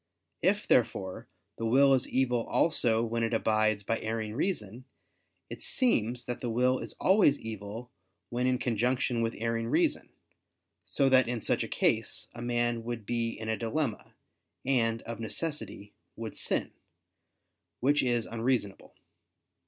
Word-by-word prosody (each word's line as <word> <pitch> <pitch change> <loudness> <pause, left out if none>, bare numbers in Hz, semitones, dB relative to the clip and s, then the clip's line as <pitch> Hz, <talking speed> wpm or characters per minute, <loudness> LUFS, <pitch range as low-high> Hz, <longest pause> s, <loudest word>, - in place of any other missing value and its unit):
If, 205 +4 +1
therefore, 100 -6 +1 0.3
the 115 - -2
will 135 +4 +5
is 130 - +1
evil 125 -3 +1
also 115 -8 +2
when 115 0 -1
it 115 0 +1
abides 110 -2 +2
by 115 +3 -1
erring 110 -1 -3
reason, 125 - -3 0.6
it - - -8
seems 125 - +1
that 125 - -4
the 120 - -2
will 125 +3 +2
is - - -7
always 190 -7 +4
evil 110 +2 -7 0.4
when 125 +1 0
in 130 0 +2
conjunction 125 +1 0
with 115 0 -1
erring 115 +1 -1
reason: - - +1 0.8
so 135 - +1
that 130 -2 +5
in 120 -1 -2
such - - 0
a - - -4
case - - 0
a 120 - -8
man 120 -1 0
would 115 -2 -5
be 115 -1 -2
in 110 - -6
a 110 - +1
dilemma, 115 +1 -3 0.5
and, 115 -4 +1
of 115 -1 -6
necessity, 115 -4 -5 0.2
would 110 -2 -6
sin: - - -1 1.1
which 145 +3 +3
is 120 -3 +1
unreasonable. 115 -3 -2
120 Hz, 145 wpm, -30 LUFS, 110-130 Hz, 1.1 s, will